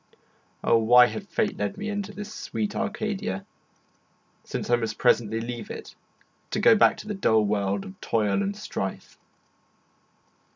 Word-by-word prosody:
Ah, - - +4
why 120 +2 +7
had 200 - -5
fate 210 -1 -1
led 200 - -2
me 210 +1 -4
into 205 -1 -3
this 210 +1 -8
sweet 210 -1 -3
Arcadia, 215 -2 -3 1.0
since - - -4
I - - +7
must 115 -3 -3
presently 115 -1 +2
leave 120 0 -5
it - - -8 0.6
to - - -1
go 230 - +6
back 215 - +5
to - - -9
the 210 - -2
dull 110 - +3
world 100 -1 0
of 95 0 -12
toil 110 - +1
and 200 0 -2
strife. 155 - -5
190 Hz, 155 wpm, -26 LUFS, -, 1.0 s, why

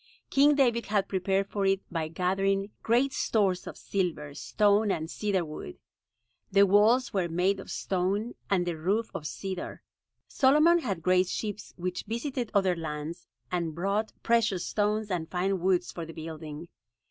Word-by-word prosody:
King 290 +2 +5
David 240 -4 +2
had 205 -2 +1
prepared 195 +1 0
for 200 - -1
it 195 0 +3
by 165 -2 -1
gathering 195 +4 0
great 250 +4 +2
stores 195 -5 +1
of - - -7
silver, 165 -7 -2
stone 205 +6 +2
and 160 -3 -2
cedar 195 -5 0
wood. 150 - -8 0.7
The 200 +1 +6
walls 220 +6 +4
were 185 -4 0
made 185 +4 +1
of - - -9
stone 195 +5 -1 0.2
and 185 -3 +2
the 175 -2 -2
roof 205 +7 0
of 150 - -4
cedar. 190 +3 -6 0.4
Solomon 305 +6 +5
had 195 - -3
great 185 +1 +3
ships 210 +2 -5
which 180 0 -3
visited 240 +1 -3
other 190 -3 +3
lands 160 +1 -6 0.2
and 170 -3 -2
brought 200 +5 -1
precious 220 -6 +2
stones 210 0 0
and 165 -3 -2
fine 190 +1 0
woods 180 0 +1
for 170 - -6
the 165 0 -8
building. 160 0 -7
195 Hz, 160 wpm, -28 LUFS, 175-210 Hz, 0.7 s, The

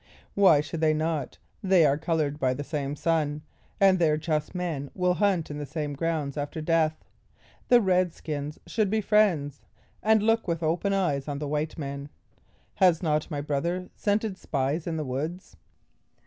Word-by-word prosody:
"Why 185 -7 +5
should 155 +2 -6
they 155 -1 +3
not? 155 -2 -2 0.2
they 185 -4 +4
are 140 -1 +4
colored 155 -2 -1
by 130 -2 +1
the 145 - -4
same 145 -1 -3
sun, 150 -2 0 0.4
and 190 -2 +5
their 155 -3 +3
just 155 +1 -2
men 160 -6 -3
will 180 -1 +2
hunt 185 -5 +1
in 145 - -5
the 145 - -4
same 150 -2 -3
grounds 150 -2 -2
after 145 +2 -4
death. 155 0 +1 0.6
The 245 -1 +6
red 185 -3 +2
skins 150 -1 -5
should 215 -3 0
be 220 +2 +1
friends, 195 -10 +2 0.4
and 220 -1 +3
look 225 0 +2
with 170 -1 -1
open 170 +5 0
eyes 155 -8 0
on 145 -1 -3
the 145 0 -4
white 150 +2 -2
men. 140 -1 -5 0.7
Has 180 -3 +4
not 155 -2 0
my 145 -1 -3
brother 170 +6 -2
scented 205 -1 -1
spies 145 +3 -2
in 165 -1 -2
the 155 - -3
woods?" 155 +8 -5
160 Hz, 175 wpm, -27 LUFS, 145-180 Hz, 0.7 s, The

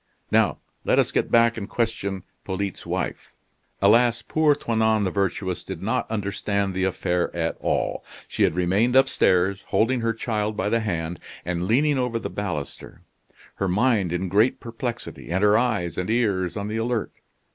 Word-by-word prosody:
Now - - +3 0.3
let - - +2
us - - +3
get - - 0
back 115 0 +4
and 105 -1 -5
question 100 -5 -2 0.2
Polyte's 95 0 -4
wife." - - -4 0.5
Alas! 115 +3 +4
poor 155 -2 +3
Toinon 110 -5 +1
the 95 - 0
Virtuous 95 -1 -1
did - - -7
not - - -1
understand 100 -2 -1
the 95 0 0
affair 90 -1 0
at 85 -1 -1
all. - - -1 0.2
She - - -4
had - - +3
remained 100 +8 +2
upstairs, 100 -7 +3
holding 120 +2 +1
her 115 0 +1
child 110 -2 -2
by 105 - 0
the 115 - +2
hand, 85 -6 -3 0.3
and 90 0 -2
leaning 140 +5 +3
over 125 -2 0
the - - -5
baluster; 90 -9 -5 0.5
her 95 - 0
mind 105 -1 +2
in 90 +2 -1
great 105 +7 +2
perplexity 120 +1 -6
and 95 +4 0
her 105 0 +5
eyes 110 -9 0
and 90 - -3
ears 105 -6 +1
on 100 0 -3
the 110 +1 -3
alert. 115 -1 -1
105 Hz, 170 wpm, -24 LUFS, 95-115 Hz, 0.5 s, her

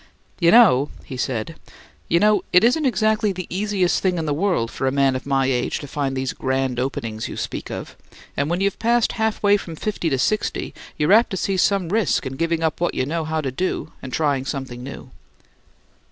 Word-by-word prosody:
"You 170 -2 +4
know," 170 - +6 0.2
he 130 - -7
said; 130 +4 -3 0.5
"you 170 - +4
know 210 -1 +3
it 180 +3 +6
isn't 265 +5 +3
exactly 215 -2 +1
the 185 -1 -5
easiest 195 -2 0
thing 185 -2 +1
in 160 - -2
the 150 - 0
world 160 -8 0
for 135 - -2
a - - +2
man 135 -1 +2
of 130 - -5
my 135 -1 +2
age 125 -2 0
to 145 - -8
find 135 -1 -2
these 130 0 -2
grand 130 -1 -1
openings 115 -4 -3
you - - -7
speak - - -5
of. - - -7 0.4
And 140 +2 -1
when 175 +2 -1
you've 200 0 0
passed 235 0 +2
half 220 -1 -1
way 205 0 +5
from 170 -5 -8
fifty 190 -1 -2
to 135 - 0
sixty 215 +11 -1 0.2
you're 150 +6 +3
apt 230 +3 +5
to 190 - -3
see 195 +1 -1
some 190 -1 +1
risk 210 -7 +1
in 130 - -4
giving 165 +1 -1
up 160 +1 -1
what 175 - 0
you 130 - 0
know 160 +3 -2
how 160 0 -1
to 135 -3 -3
do 185 +9 -3
and 130 - -7
trying 145 -3 0
something 130 -3 -5
new." 130 0 -9
160 Hz, 215 wpm, -22 LUFS, 135-200 Hz, 0.5 s, know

